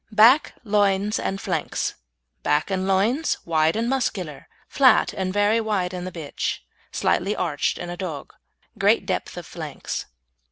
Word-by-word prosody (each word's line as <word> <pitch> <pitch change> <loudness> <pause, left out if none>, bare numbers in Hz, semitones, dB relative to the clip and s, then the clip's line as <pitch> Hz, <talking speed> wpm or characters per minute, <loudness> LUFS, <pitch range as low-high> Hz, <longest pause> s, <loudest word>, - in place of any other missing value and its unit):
BACK, 230 +7 +5
LOINS 205 -1 +2
AND 195 - -2
FLANKS - - -2 0.5
Back 150 +6 +1
and 190 0 -1
loins 220 +11 +2
wide 160 -1 +2
and 230 +1 0
muscular; 195 - -2 0.2
flat 260 -5 +4
and 185 -1 -2
very 205 +3 +3
wide 195 -5 -1
in 180 0 -4
a - - -5
bitch, 160 -5 -4 0.3
slightly 200 +4 +1
arched 155 -5 -1
in 175 - -5
a 175 - -6
dog. 170 -7 -6 0.5
Great - - +3
depth - - -3
of - - -6
flanks. - - -6
195 Hz, 150 wpm, -24 LUFS, 175-215 Hz, 0.5 s, BACK